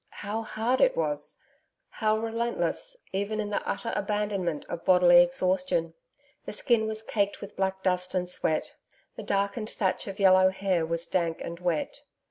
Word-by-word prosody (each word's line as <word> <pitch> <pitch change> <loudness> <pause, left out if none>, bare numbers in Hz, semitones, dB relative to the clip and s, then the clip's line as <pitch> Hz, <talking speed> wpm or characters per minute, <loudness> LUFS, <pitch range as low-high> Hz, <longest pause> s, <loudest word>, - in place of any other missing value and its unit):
How 215 +2 -2
hard 225 +3 -1
it - - +4
was. 295 -12 -2 0.5
How 215 -1 0
relentless, 235 - -2 0.2
even 200 +3 -1
in 210 -1 -2
the - - 0
utter 230 - -3
abandonment 200 -6 -1
of 170 - -6
bodily 180 -2 +7
exhaustion! 175 -1 0 0.5
The - - -5
skin 220 +1 +2
was 220 0 -4
caked 205 -2 -1
with 200 - -9
black 190 0 -1
dust 180 0 0
and 180 -1 0
sweat. 175 -3 -1 0.4
The - - -6
darkened 200 +3 -1
thatch 190 -1 -1
of 195 -1 -6
yellow 185 -1 +6
hair 190 -3 0
was 170 +1 -1
dank 170 -3 -1
and 170 0 -6
wet. 175 -4 -2
195 Hz, 160 wpm, -28 LUFS, 180-215 Hz, 0.5 s, bodily